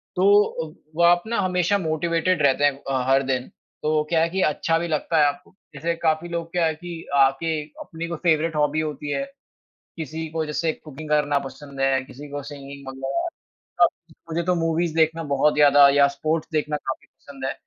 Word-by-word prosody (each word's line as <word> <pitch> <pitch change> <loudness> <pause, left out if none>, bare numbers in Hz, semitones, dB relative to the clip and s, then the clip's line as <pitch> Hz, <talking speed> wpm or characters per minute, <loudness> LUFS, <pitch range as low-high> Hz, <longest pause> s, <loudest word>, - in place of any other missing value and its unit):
तो 200 +3 +6 0.2
अव 155 - -12 0.2
वो 170 - +2
आप 175 0 +5
ना 230 -2 -1
हमेशा 180 +1 +1
मोटिवेटेड 170 0 0
रहते 140 0 +3
हैं 145 - +5 0.2
अ, 130 -2 0
हर 135 +1 +4
दिन, 130 -1 -1 0.4
तो 155 0 +2
क्या 165 -1 +3
है 165 - +2
कि 190 +3 -1
अच्छा 165 +1 +1
भी 170 - -2
लगता 160 +1 0
है 150 - +6
आपको। 180 +6 -5 0.2
जैसे 170 +1 -1
काफ़ी 160 +2 +1
लोग 170 -1 -4
क्या 175 -1 +1
है 160 - +1
कि 170 +1 -8
आके 140 +4 +2 0.2
अपनी 165 +1 -6
कोई 170 -1 -4
फेवरेट 160 -1 +2
हॉबी 150 0 +1
होती 150 -1 -4
है, 275 - -1 0.7
किसी 160 +1 -5
को 160 -1 -2
जैसे 155 +2 -1
कुकिंग 155 0 -11
करना 145 -1 +2
पसँद 135 +1 -10
है, 135 0 +2
किसी 145 +3 -11
को 145 0 -5
सिंगिंग 140 -1 -10
वग़ैरह। 135 - -3 0.6
अ, - - +8 0.4
मुझे 165 +2 -1
तो 180 +1 +2
मूवीज़ 165 0 0
देखना 160 0 +2
बहुत 150 +2 +3
ज़्यादा 145 -1 +7
या 140 0 +5
स्पोर्ट्स 155 +3 -2
देखना 150 -1 0
काफ़ी 130 -2 -6
पसँद 135 -2 -12
है। 135 - 0
155 Hz, 195 wpm, -23 LUFS, 145-170 Hz, 0.7 s, अ